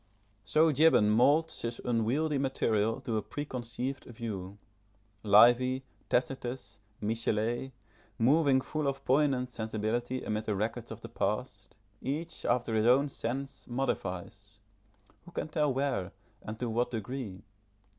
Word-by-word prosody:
So 155 +9 +4
Gibbon 145 -8 +5
moulds 145 +9 +3
his 115 0 -3
unwieldy 125 +6 +1
material 115 -3 +1
to 120 -4 -2
a - - 0
preconceived 130 -1 -4
view. 100 -5 -6 0.6
Livy, 120 +5 +5 0.3
Tacitus, 120 -5 -2 0.2
Michelet, 115 +3 -1 0.5
moving 135 +2 +4
full 155 +2 -2
of 135 0 -3
poignant 130 -2 +2
sensibility 115 +3 -2
amid 110 0 -2
the 105 - 0
records 110 +3 -3
of - - -8
the - - -8
past, - - -3 0.2
each, 160 +4 -3
after 120 -2 +1
his 110 +1 +3
own 135 +4 +5
sense, 135 +2 -5
modifies 105 -5 -3 0.7
who - - -11
can - - -3
tell 150 -2 +1
where 130 -9 -1 0.3
and 110 +1 -6
to 120 - -2
what 120 +2 0
degree? 110 -3 -5
120 Hz, 125 wpm, -31 LUFS, 110-135 Hz, 0.7 s, Gibbon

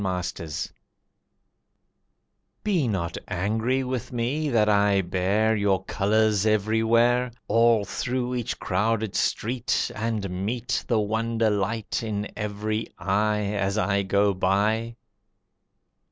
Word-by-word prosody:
Apology 90 -4 -3 1.9
Be 180 - +1
not 95 -6 -2
angry 110 +8 0
with 125 -2 -4
me 130 +6 -1
that 110 -4 +3
I 100 -1 +3
bear 95 +5 +1
Your 100 -2 +1
colours 105 0 +2
everywhere, 115 +3 +2 0.2
All 115 -2 +4
through 125 +2 -2
each 120 -3 -2
crowded 105 +2 -1
street, 120 +2 0
And 110 -2 -2 0.2
meet 120 +3 -2
The 115 -3 +2
wonder 110 +1 0
light 105 +2 -1
in 105 -2 -3
every 105 +1 -3
eye, 105 +2 +1
As 100 0 -1
I 100 -1 +1
go 100 +1 +2
by. 105 +5 +1
110 Hz, 110 wpm, -25 LUFS, 100-115 Hz, 1.9 s, All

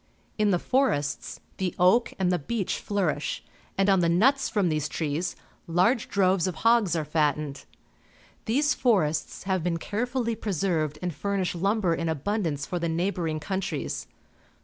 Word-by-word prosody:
In 210 -1 +3
the 185 - +3
forests 170 - 0 0.2
the 185 -2 -2
oak 185 +7 +4
and 185 -2 +1
the 180 - +1
beech 200 +6 -2
flourish, 180 -8 -1 0.3
and 195 0 +3
on 195 -1 +5
the 170 -1 +2
nuts 265 +11 +3
from 205 -4 +1
these 155 -3 -1
trees 160 +3 -2 0.3
large 185 +8 +2
droves 190 -2 +2
of 180 - -3
hogs 230 -7 +4
are 160 -2 -1
fattened. 150 -2 -1 0.8
These 285 +6 +2
forests 190 - +1
have 190 -3 0
been 170 -1 0
carefully 235 +5 -2
preserved 170 -7 -1
and 175 -2 -1
furnish 195 +4 -1
lumber 195 0 +1
in 165 0 -1
abundance 160 -1 -1
for 180 - -3
the 170 0 -1
neighbouring 165 -2 -1
countries. 190 +4 -3
180 Hz, 150 wpm, -27 LUFS, 160-205 Hz, 0.8 s, on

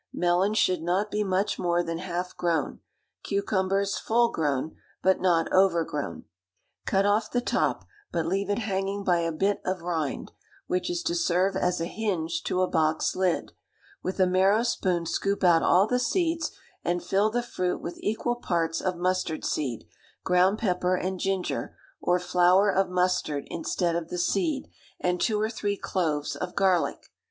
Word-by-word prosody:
Melons 180 +4 +1
should 185 -5 +2
not 185 +5 0
be 210 0 0
much 190 +1 0
more 175 0 +1
than 165 -1 -4
half 180 0 -4
grown; 165 -4 -1 0.4
cucumbers 195 0 0
full 235 +1 +2
grown, 150 -1 -1 0.3
but 190 0 +3
not 170 -3 +2
overgrown. 165 - +1 0.6
Cut 195 0 +2
off 210 +2 +2
the 245 - 0
top, 245 - 0 0.3
but 165 - -1
leave 195 +4 -1
it 205 - +1
hanging 200 -2 -2
by 175 -3 +2
a 165 0 0
bit 195 +6 0
of 185 -2 -3
rind, 160 -5 -3 0.3
which 180 - -1
is 350 0 -2
to 335 - 0
serve 195 - +1
as 180 -1 0
a 165 - -1
hinge 170 -5 -2
to 185 - +1
a - - +2
box 155 -1 +1
lid; 185 -2 0 0.5
with 185 +1 -4
a 185 - +6
marrow 190 +4 +3
spoon 180 -7 0
scoop 200 +4 -1
out 170 -2 +5
all 185 +3 +4
the 250 +3 0
seeds, 330 +3 0 0.3
and 175 0 -1
fill 200 +3 +2
the 240 +2 -1
fruit 180 -6 -2
with 170 - -7
equal 240 +3 -1
parts 165 -7 -1
of 185 -2 -1
mustard 180 -3 -1
seed, 130 -7 -2 0.4
ground 185 +3 +3
pepper, 180 -4 +1
and 185 0 -3
ginger, 190 -1 -2 0.2
or 180 - +2
flour 180 +3 +4
of 195 0 +1
mustard 180 -5 0
instead 170 +1 -1
of 170 -1 -2
the 180 - -4
seed, 175 - 0 0.3
and 180 0 0
two 215 -2 +1
or 215 +1 0
three 205 -3 -2
cloves 155 -8 -1
of 180 0 -5
garlic. 190 -3 +1
185 Hz, 170 wpm, -27 LUFS, 170-200 Hz, 0.6 s, a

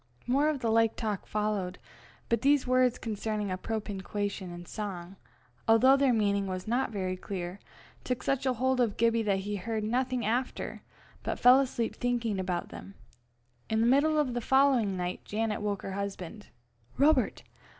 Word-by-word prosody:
More 280 +5 +3
of 285 -5 -3
like 225 0 +3
talk 215 -4 -3
followed, 210 -4 -1 0.5
but 230 -1 +1
these 280 0 +3
words 255 -1 +3
concerning 215 -2 -3
appropinquation 205 -1 -4
in 175 0 -8
song, 190 -3 -6 0.5
although 240 +4 +6
their 275 -1 +3
meaning 200 -3 +1
was 185 0 -5
not 245 +4 +1
very 190 -4 -2
clear, 185 0 -6 0.4
took 250 -1 -3
such 275 -1 0
a 255 - +3
hold 260 +2 +1
of 225 -4 0
Gibbie 230 0 +3
that 200 -3 0
he 205 +1 -3
heard 215 +3 -3
nothing 250 +1 0
after, 245 +4 -2 0.4
but - - -3
fell 250 +2 +7
asleep 245 -4 -1
thinking 235 -5 -1
about 180 -2 -2
them. 195 - -10 0.7
In 220 - +1
the 225 - +3
middle 285 +5 +4
of 285 -5 +1
the 240 - -2
following 260 -6 +3
night, 180 0 -3
Janet 215 0 -2
woke 205 -2 -2
her - - -4
husband. 200 +1 -5 0.5
"Robert! 280 -3 +3
220 Hz, 160 wpm, -29 LUFS, 200-250 Hz, 0.7 s, fell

